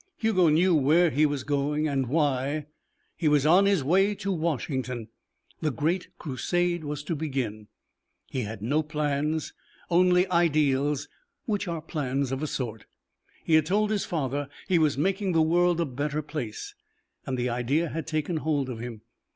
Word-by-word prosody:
Hugo 190 -7 +3
knew 170 +4 +4
where 160 +3 +4
he 150 +3 +3
was 145 -3 -3
going 145 +2 0
and 135 -3 0
why: 145 0 0 0.5
he 165 - -1
was 150 -1 +3
on 180 +6 +6
his 195 -8 +2
way 195 +8 +3
to 200 0 -3
Washington. 130 - -2 0.5
The 155 - 0
great 160 +8 -1
crusade 175 +4 -1
was 145 -1 -4
to 165 - -2
begin. 130 -9 -3 0.6
He 130 - -1
had 105 -2 -6
no 145 +7 +2
plans, 150 0 -1 0.4
only 180 +1 +5
ideals, 150 -4 +2 0.4
which 205 -3 -1
are 165 -2 -3
plans 140 -3 -2
of 135 +1 -2
a 155 - -1
sort. 115 -6 -4 0.6
He 165 - 0
had 155 0 +5
told 210 +3 +2
his 210 -2 0
father 145 -3 -2 0.2
he 180 -3 +3
was 150 -4 +2
making 190 +4 0
the 160 -1 +4
world 175 +1 +3
a 170 - +2
better 145 +3 -3
place, 145 -8 -5 0.5
and 130 -1 -1
the 125 0 0
idea 130 +8 0
had 165 +2 -5
taken 155 +1 -1
hold 150 -4 -1
of 120 -3 -5
him. 115 -2 -7
150 Hz, 165 wpm, -27 LUFS, 135-170 Hz, 0.6 s, on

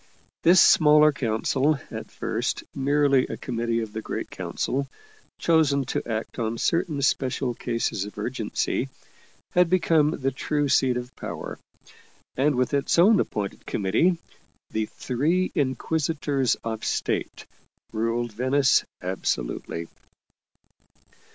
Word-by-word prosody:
This 175 +2 +6
smaller 150 -1 +6
council, 135 +3 0
at - - -6
first - - -2
merely 140 -1 +2
a - - -5
com 120 -3 -5
mittee 115 0 0
of 105 -1 -8
the 110 - -4
Great - - -5
Council, 140 +2 -2 0.5
chosen 150 -5 +2
to - - -2
act 110 +3 -4
on 115 0 -1
certain 155 0 0
special 130 -2 0
cases 115 -4 -2
of 105 0 -9
urgency, 120 +3 -2 0.6
had 180 -1 +4
become 165 -4 +3
the 135 -4 -1
true 145 +2 -1
seat 130 -2 +3
of 125 +1 -7
power, - - -6 0.8
and 140 +2 +2
with 125 +3 0
its 140 +3 +1
own 200 +4 +6
appointed 100 -2 -3
committee, 160 - +2 0.5
the 110 -1 -1
Three 160 +9 0
Inquisitors 145 -1 0
of 110 -1 -4
State, - - -2 0.5
ruled 115 +2 -1
Venice 130 +4 +3 0.2
absolutely. 85 -2 -3
135 Hz, 120 wpm, -25 LUFS, 115-150 Hz, 0.8 s, This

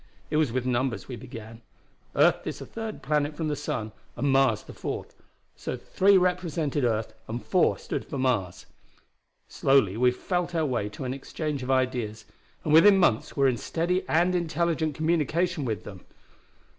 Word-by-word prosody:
It 150 - +2
was 155 -6 +2
with 130 +1 -1
numbers 130 0 -1
we 125 - -5
began. 115 -1 -10 0.5
Earth - - +3
is - - -3
the - - -8
third 225 -1 -6
planet 150 +1 0
from 155 0 -2
the 150 - 0
sun 110 -5 -3 0.2
and 140 - 0
Mars 135 -5 +3
the - - -11
fourth, - - -5 0.4
so - - -5
three 195 +1 +3
represented 170 -6 0
earth 115 -2 0
and 115 +2 -5
four 185 -3 +3
stood - - -4
for 140 - -5
Mars. 120 -9 -1 0.8
Slowly 130 -8 +2
we 125 +1 +5
felt 175 +7 -2
our 160 -1 +2
way 120 -7 -1
to 120 - -8
an 130 0 -2
exchange 145 +1 -4
of 125 - -6
ideas, 125 -5 0 0.4
and 150 - 0
within 195 +5 +8
months 145 - +2
were 140 -1 +4
in 125 -2 +1
steady 170 - -1
and 175 +3 +3
intelligent 165 -3 0
communication 165 +1 0
with 110 -3 -3
them. 95 -3 -10
140 Hz, 170 wpm, -27 LUFS, 120-165 Hz, 0.8 s, within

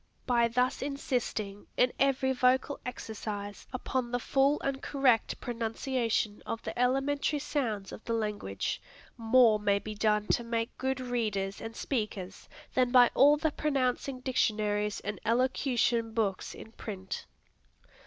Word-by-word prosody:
By 240 -2 +3
thus 250 +2 0
insisting, 245 -7 -3
in 250 0 +3
every 265 -1 +2
vocal 260 +2 +2
exercise, 205 -4 -6
upon 255 -1 -2
the 245 - 0
full 275 +4 +2
and 275 -1 -2
correct 265 -5 +2
pronunciation 230 -2 -1
of 225 - -4
the 220 - -5
elementary 270 +4 +1
sounds 235 -9 -2
of - - -9
the 230 - -1
language, 210 - -2 0.3
more 230 -1 +5
may 205 -1 +2
be 215 +2 -5
done 210 0 +1
to 240 - +2
make 230 0 -2
good 265 0 -1
readers 215 -6 -2
and 225 0 -6
speakers 210 -7 -4 0.2
than 255 -1 +3
by 245 -2 +7
all 290 +3 +6
the 315 0 0
pronouncing 270 -3 -1
dictionaries 210 -5 0
and 205 -3 -5
elocution 235 -1 +1
books 205 -4 -1
in 220 - -11
print. 195 -4 -6
235 Hz, 135 wpm, -30 LUFS, 215-260 Hz, 0.3 s, by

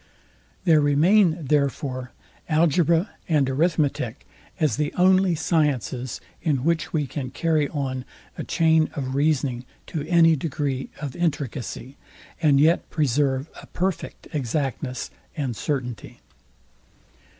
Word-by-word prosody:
There 160 -4 +5
remain, 165 +3 +3
therefore, 135 -2 -1 0.4
algebra 165 +3 +3 0.2
and 150 -4 +3
arithmetic 140 -4 0 0.3
as 150 -9 +1
the 150 0 0
only 185 0 +4
sciences, 145 - 0 0.2
in 140 -6 0
which 165 0 0
we 150 -3 0
can 135 -1 -5
carry 155 -1 0
on 130 -4 -3 0.3
a - - -5
chain 160 -1 +3
of 130 -3 -3
reasoning 140 -4 +1 0.2
to 160 - -4
any 165 -1 +5
degree 140 -3 -3
of 145 -4 -5
intricacy, 140 -5 -3 0.4
and 145 -4 +4
yet 160 +4 +3
preserve 140 -1 +1
a - - -14
perfect 185 0 -3
exactness 135 -1 -2 0.3
and 135 -6 -2
certainty. 125 -3 -4
150 Hz, 115 wpm, -24 LUFS, 130-165 Hz, 0.4 s, There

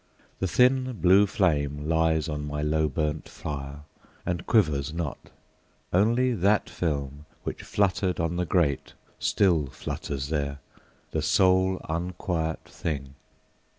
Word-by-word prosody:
the 95 - 0
thin 130 +6 +3
blue 100 -1 +5
flame 75 -8 0
Lies 80 -1 +2
on 75 -2 -3
my 75 0 -3
low 80 +1 +2
burnt 75 +1 -2
fire, 70 0 -6 0.4
and 90 -1 -3
quivers 75 - +2
not; 80 -3 -5 0.6
Only 120 +7 +3
that 100 0 +2
film, 70 -3 -3 0.2
which - - -4
fluttered 95 -2 0
on 85 +1 0
the 90 0 0
grate, 80 -7 +1 0.3
Still 85 -8 +2
flutters 70 +1 -5
there, 70 -2 -1 0.5
the - - -1
sole 95 0 +3
unquiet 85 -1 -2
thing. 70 -4 -4
80 Hz, 120 wpm, -27 LUFS, 75-95 Hz, 0.6 s, blue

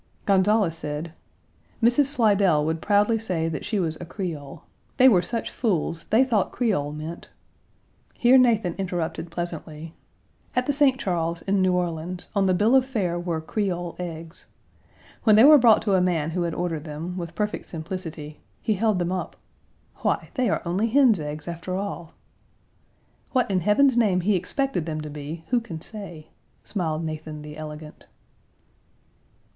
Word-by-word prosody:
Gonzales 195 -3 +3
said: 155 +1 -5 0.7
"Mrs. 240 +5 +4
Slidell 205 - +3
would 160 +1 -2
proudly 210 +2 +3
say 175 -7 -2
that 155 -3 -4
she 215 - -1
was 160 -3 -2
a - - -5
Creole. 160 -6 -6 0.3
They 260 0 +7
were 195 -9 +6
such 230 +5 -3
fools, 170 -7 -1
they 230 +4 +4
thought 225 -7 +1
Creole 195 - 0
meant 155 +3 -7 0.4
" - - -38
Here 250 +2 +5
Nathan 225 -8 +3
interrupted 170 -3 -3
pleasantly: 165 -2 -6 0.6
"At 250 - +1
the 285 - 0
St. 275 -2 +3
Charles, 170 -5 -2
in 195 0 +1
New 185 -1 +3
Orleans, 175 0 -3
on 195 -1 +3
the 185 - +3
bill 215 +7 +3
of 265 - +6
fare 200 -10 -2
were 175 -2 -2
'Creole 175 -1 -3
eggs.' 165 -1 -7 0.8
When 215 -2 +6
they 220 - +7
were 295 +1 +9
brought 230 -4 +5
to 205 -3 +1
a 185 - +4
man 165 -4 0
who 180 +2 -2
had 170 -2 -2
ordered 165 -4 -2
them, 160 +4 -6
with 170 -2 -6
perfect 210 +2 -3
simplicity, 160 -3 -7 0.2
he 220 - 0
held 215 0 +1
them 175 0 -1
up, 185 - -4 0.6
'Why, - - -1
they 255 -6 +1
are - - -1
only 185 +6 0
hens' 240 -5 +4
eggs, 150 +1 -6
after 170 +2 -4
all.' 185 -4 -5 1.2
What 250 -5 +2
in 185 - +2
Heaven's 235 +8 +3
name 205 -6 +3
he 200 +3 +2
expected 185 - -1
them 155 -1 -3
to 150 -1 -7
be, 150 +3 -7
who 245 - +3
can 180 -9 -8
say?" 175 -5 -9 0.3
smiled 165 -5 -2
Nathan 155 -1 -6
the 150 0 -9
elegant. 155 0 -9
180 Hz, 165 wpm, -24 LUFS, 160-215 Hz, 1.2 s, were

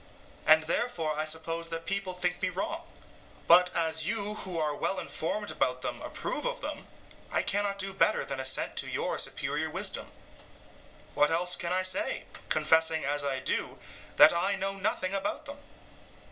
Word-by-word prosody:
and 160 0 +7
therefore 165 -2 0
I 155 +1 -1
suppose 165 +1 -3
that 165 0 -4
people 195 -1 -1
think 180 0 -2
me 185 - +1
wrong. 195 - -3 0.7
But, 180 +2 +8
as 160 -1 +1
you 210 +3 -1
who 190 -4 -6
are 155 -2 0
well 195 - -1
informed 205 +6 -3
about 125 0 -1
them - - -4
approve - - -4
of - - -2
them, - - -6 0.4
I - - +1
cannot 200 0 -1
do 195 0 -1
better 205 +2 +2
than 135 -1 -4
assent 130 0 0
to - - -1
your - - -2
superior - - -2
wisdom. - - -3 1.1
What 150 - +4
else 175 +2 +2
can 170 0 -3
I 185 +1 +1
say, 185 0 0 0.3
confessing 160 +1 +3
as 145 +1 0
I 135 -2 -1
do, - - -2 0.4
that - - +10
I 190 +4 +1
know 195 0 -2
nothing 190 -1 -1
about 310 +10 -2
them? 285 0 -9
180 Hz, 170 wpm, -29 LUFS, 160-195 Hz, 1.1 s, that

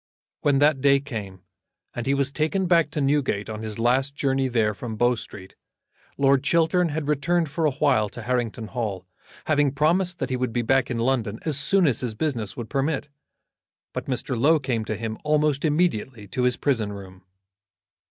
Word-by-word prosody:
When 145 -2 +2
that 145 -1 +3
day 140 0 +5
came, 105 -9 -7 0.5
and 120 0 -5
he 140 - +2
was 140 0 0
taken 160 +6 0
back 170 -3 +3
to 150 0 -3
Newgate 135 -7 0
on 110 0 -6
his 110 -1 -6
last 130 +4 +1
journey 135 -2 0
there 115 -4 +1
from 110 +2 -6
Bow 120 +3 +3
Street, 100 -5 -9 0.6
Lord 135 -1 +3
Chiltern 170 +3 +2
had 150 -1 -3
returned 160 +3 +1
for 160 +1 -1
a - - +1
while 130 -7 +2
to 120 - -9
Harrington 115 -2 -2
Hall, 105 -7 -4 0.4
having 145 -2 +2
promised 175 +5 +1
that - - -3
he - - +1
would 125 -2 -2
be 120 - 0
back 135 +2 +2
in 120 - -2
London 115 -3 0
as 150 -4 0
soon 190 +6 +3
as 130 -7 +2
his 120 -4 -3
business 120 -6 -2
would 120 -2 -5
permit; 140 +2 -1 0.8
but - - -4
Mr. 130 0 -1
Low 145 +8 +4
came 130 -6 -2
to 110 - -3
him 110 0 -5
almost 150 -2 +1
immediately 135 - 0
to 125 +5 -1
his 125 -1 +4
prison 115 -8 0
room. 95 -2 -10
135 Hz, 190 wpm, -24 LUFS, 115-150 Hz, 0.8 s, day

